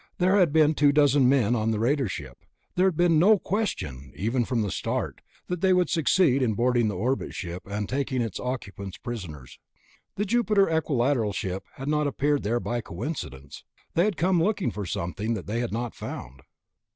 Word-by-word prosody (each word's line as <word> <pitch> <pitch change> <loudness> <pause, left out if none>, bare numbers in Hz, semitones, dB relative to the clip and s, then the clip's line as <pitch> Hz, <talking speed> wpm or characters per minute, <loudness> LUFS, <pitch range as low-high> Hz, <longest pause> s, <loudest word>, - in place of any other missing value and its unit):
There 190 +2 +3
had 175 -6 +4
been 155 0 +4
two 145 -1 +4
dozen 145 -3 +4
men 125 -4 +3
on 110 -1 0
the 110 - 0
raider 130 +4 +1
ship; 65 -8 -7 0.3
there 185 +1 +3
had 180 -5 -1
been 175 -3 +4
no 205 +5 +6
question, 75 - -3
even 115 +4 0
from 115 -2 0
the 100 - -2
start, - - -3 0.2
that 180 -1 -4
they 190 -1 +4
would 180 -1 +2
succeed 160 -4 +3
in 115 -5 +1
boarding 120 0 +2
the 105 - -2
orbit 125 +7 -1
ship 90 -1 -5
and 105 0 -3
taking 130 -1 -1
its 115 -5 -2
occupants 100 -6 -5
prisoners. 90 - -8 0.6
The 205 - -1
Jupiter 210 -2 +3
Equilateral 135 -8 +1
ship 95 0 -4
had 135 - -8
not 150 0 +1
appeared 145 +1 +1
there 115 +3 0
by 120 0 -2
coincidence. 85 - -6 0.3
They 170 - +3
had 210 -4 -1
come 180 0 +2
looking 200 - 0
for 100 -1 -5
something 100 +8 -2
that 95 - -6
they 110 +3 -2
had 120 -1 -2
not 120 +2 -3
found. 65 +2 -8
125 Hz, 190 wpm, -26 LUFS, 105-160 Hz, 0.6 s, no